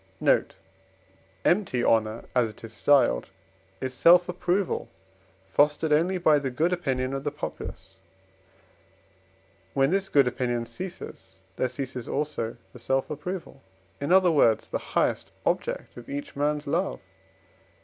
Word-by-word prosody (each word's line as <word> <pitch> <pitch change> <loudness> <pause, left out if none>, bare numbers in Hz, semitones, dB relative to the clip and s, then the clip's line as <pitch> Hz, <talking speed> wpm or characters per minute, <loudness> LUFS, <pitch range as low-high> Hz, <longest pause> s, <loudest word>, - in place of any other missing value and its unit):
Note - - +2 0.9
Empty 175 -10 +2
honour, 110 0 +1
as 125 -3 +2
it 110 - -14
is 115 -1 -8
styled, 125 - +3 0.5
is 130 0 -3
self 175 +6 +6
approval, 180 +1 -1 0.6
fostered 150 +5 +3
only 175 +5 +2
by 155 -4 +4
the 140 -2 -2
good 160 +8 +1
opinion 135 -7 -1
of 135 0 -3
the 145 - 0
populace; 145 - -7 1.8
when 135 +2 +3
this 195 0 0
good 140 -3 +4
opinion 120 -1 -1
ceases 115 - -8
there 130 - 0
ceases 130 -1 -5
also 140 -6 -2 0.2
the 125 - -11
self 135 +4 -1
approval, 150 -1 -6 0.4
in 140 +4 -2
other 185 -1 +6
words, 115 -8 +4
the - - -2 0.2
highest - - +1 0.2
object - - -1
of 120 -1 -11
each 145 +1 -5
man's 145 +1 0
love 175 +7 0
(IV. - - -18
140 Hz, 140 wpm, -26 LUFS, 125-170 Hz, 1.8 s, self